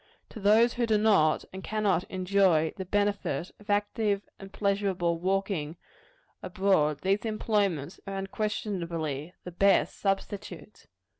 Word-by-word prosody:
To 225 - -9
those 220 +4 +4
who 240 -1 0
do 215 -1 +3
not 200 -8 +3
and 190 0 -7
cannot 205 -4 0
enjoy 185 -4 +2
the 190 - -5
benefit 205 -2 -1
of 210 0 -18
active 205 0 0 0.2
and 195 0 -10
pleasurable 195 -5 0
walking 185 -4 -1 0.6
abroad, 175 -6 +1
these 195 +1 +1
employments 205 -8 -1
are 195 - -4
unquestionably 175 -7 -3
the 180 - -7
best 195 +3 +2
substitutes. 200 +1 -4
195 Hz, 125 wpm, -28 LUFS, 175-205 Hz, 0.6 s, those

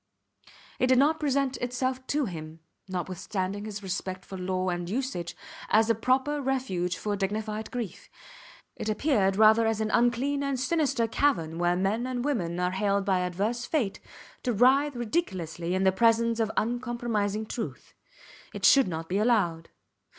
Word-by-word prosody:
It 255 - +3
did 255 0 +4
not 300 +4 +3
present 275 -3 0
itself 255 +1 -2
to 290 -1 +1
him, 160 -4 -7 0.3
notwithstanding 185 +2 -3
his 210 -1 -6
respect 185 0 -4
for 195 - -8
law 185 0 -1
and 175 -1 -3
usage, 235 -7 -3 0.3
as 220 +2 +4
a - - +4
proper 260 +6 +1
refuge 240 -10 -1
for 210 -1 -2
dignified 210 +2 -3
grief. 235 -8 -6 0.7
It 220 - -4
appeared 210 -4 +2
rather 220 +2 +6
as 225 -1 0
an 215 -1 -1
unclean 245 +4 +2
and 275 -2 -1
sinister 275 -3 +1
cavern 170 - 0
where 175 0 +2
men 205 +7 0
and 250 0 -3
women 180 -12 -1
are 180 0 +1
haled 200 +1 0
by 190 -2 +2
adverse 200 +7 -1
fate 245 -11 -1 0.4
to 245 - 0
writhe 265 +6 +4
ridiculously 185 - -2
in 190 - +1
the 190 - +5
presence 230 +2 +3
of 220 -1 +1
uncompromising 235 -3 -1
truth. 225 +1 -6 0.6
It - - -1
should 275 -2 +6
not 165 -2 -4
be 190 +4 0
allowed. 195 -8 +1
220 Hz, 160 wpm, -28 LUFS, 185-255 Hz, 0.7 s, rather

